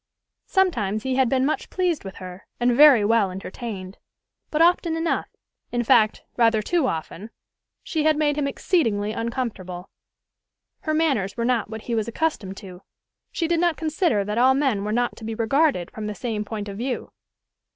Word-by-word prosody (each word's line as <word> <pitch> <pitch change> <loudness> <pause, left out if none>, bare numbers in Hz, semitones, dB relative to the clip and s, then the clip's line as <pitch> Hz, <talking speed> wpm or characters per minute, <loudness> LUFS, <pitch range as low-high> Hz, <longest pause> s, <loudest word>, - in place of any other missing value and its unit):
Sometimes 225 - +1
he 265 - -1
had 260 -2 +2
been 260 0 +2
much 300 - -2
pleased 360 -4 -1
with 195 -1 -8
her, 185 0 -10
and 240 0 +2
very 275 -6 +7
well 220 -2 +3
entertained; 190 0 -7 0.5
but 300 - -1
often 335 -1 +3
enough 325 0 -1 0.4
in 240 0 0
fact, 215 -1 +3
rather 225 -2 +3
too 335 +1 +1
often 165 +4 -5 0.5
she 315 -3 -1
had 310 -1 +3
made 295 -1 +1
him 290 -1 0
exceedingly 225 - 0
uncomfortable. 220 -7 -4 0.9
Her 310 -4 -2
manners 270 -12 0
were 235 - -1
not 240 -4 0
what 220 0 -7
he 240 - -4
was 220 -1 0
accustomed 235 -7 -2
to: 185 -3 -10 0.5
she 330 - -1
did 335 0 +1
not 345 -2 +1
consider 310 - +1
that 210 +3 -1
all 260 +2 +5
men 265 -8 +1
were 210 - -2
not 240 +2 0
to - - -11
be 220 0 -4
regarded 235 - +1
from 215 -1 -6
the 210 - -4
same 220 -3 -3
point 210 -1 -5
of 200 -1 -7
view. 250 +1 -3
235 Hz, 180 wpm, -23 LUFS, 210-300 Hz, 0.9 s, very